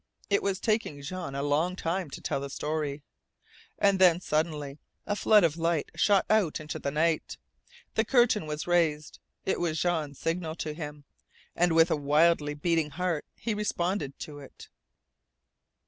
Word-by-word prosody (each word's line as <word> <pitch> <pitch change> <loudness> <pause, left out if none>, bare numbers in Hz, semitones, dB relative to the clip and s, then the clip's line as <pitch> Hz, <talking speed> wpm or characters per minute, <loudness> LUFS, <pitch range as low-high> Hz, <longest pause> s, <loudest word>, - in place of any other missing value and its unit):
It 200 - +3
was 195 -1 -1
taking 215 -10 -1
Jean 170 -2 -5
a 140 - -2
long 155 +5 +1
time 175 -1 -2
to - - -8
tell - - -1
the 140 0 -5
story! 150 -1 -3 0.7
And 200 -1 +3
then, 175 -2 +6
suddenly, 150 -4 -2 0.3
a 205 - -1
flood 210 0 +5
of 165 -1 +2
light 165 -2 0
shot 200 -2 +3
out 210 -8 +2
into 155 -1 -6
the - - -2
night. 160 +2 0 0.6
The - - +2
curtain 240 - +3
was 150 0 -4
raised! 160 -4 +1 0.3
It - - 0
was 165 -2 -1
Jean's 155 -5 -1
signal 165 -1 -2
to 155 -2 -4
him, 150 -2 -7 0.5
and 175 -1 +2
with 165 +1 +5
a - - +4
wildly 150 +1 +2
beating 165 0 0
heart 170 0 -2
he 230 - -3
responded 185 -7 -2
to 145 -1 -7
it. 140 - -13
165 Hz, 165 wpm, -28 LUFS, 150-180 Hz, 0.7 s, then